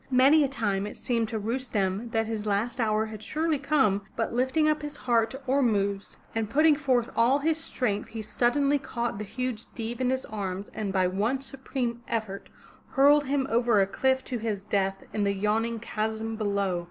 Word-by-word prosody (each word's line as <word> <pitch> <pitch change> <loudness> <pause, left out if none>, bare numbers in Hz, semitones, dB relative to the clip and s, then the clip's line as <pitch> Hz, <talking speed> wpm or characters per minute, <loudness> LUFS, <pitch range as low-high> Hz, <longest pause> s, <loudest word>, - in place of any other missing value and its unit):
Many 270 +4 +6
a - - +2
time 205 -7 -1
it - - -8
seemed 230 -3 -1
to 225 - -2
Rustem 220 -2 -1
that 225 -1 0
his 215 -1 -4
last 210 +5 0
hour 215 -1 +1
had 215 -1 -8
surely 310 +5 -1
come, 270 -8 +2
but 225 0 -2
lifting 260 +6 +2
up 305 0 +2
his 295 0 -5
heart 230 -2 +2
to 265 +4 -8
Ormuzd, 205 -7 +1 0.2
and 225 -2 -1
putting 305 +5 +5
forth 260 -4 +1
all 240 +4 +4
his 315 +2 0
strength, 210 -10 -2
he 225 -1 -6
suddenly 275 +6 +2
caught 235 -5 -3
the - - -3
huge 235 +2 -4
Deev 235 +1 -4
in 250 - +2
his 260 0 -1
arms 200 -2 -4
and 210 -3 -3
by 190 -1 +2
one 205 +8 0
supreme 260 -3 -4
effort 215 -4 -3 0.4
hurled 285 +2 +5
him 270 0 0
over 235 -2 +3
a 195 - +5
cliff 260 +6 +1
to 245 - -3
his 210 -3 -3
death 195 -1 -1
in 210 - 0
the 200 0 +1
yawning 220 +3 0
chasm 220 0 -3
below. 200 -4 0
230 Hz, 190 wpm, -27 LUFS, 210-265 Hz, 0.4 s, Many